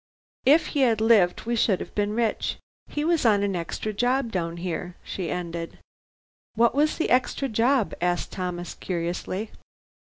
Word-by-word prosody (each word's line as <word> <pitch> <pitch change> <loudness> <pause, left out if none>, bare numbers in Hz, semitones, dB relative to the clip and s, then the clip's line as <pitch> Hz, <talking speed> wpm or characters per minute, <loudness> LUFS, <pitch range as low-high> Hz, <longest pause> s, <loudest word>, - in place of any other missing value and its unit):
If 305 +4 +6
he 295 - 0
had 235 -5 +3
lived, 220 -5 +4
we 235 +1 0
should 210 -4 +2
have - - -8
been 205 0 0
rich. 230 -2 0 0.3
He 295 - -3
was 335 0 +2
on 210 -4 +4
an 200 -2 0
extra 175 +5 -3
job 245 +2 +1
down 170 -3 -2
here," 175 0 -4
she 180 -4 -4
ended. 170 0 -4 0.8
"What 235 +1 +4
was 300 +3 +2
the 325 - -1
extra 255 +2 +2
job?" 235 0 +2
asked 175 0 0
Thomas 180 -2 -4
curiously. 180 +4 -3
210 Hz, 160 wpm, -25 LUFS, 180-245 Hz, 0.8 s, If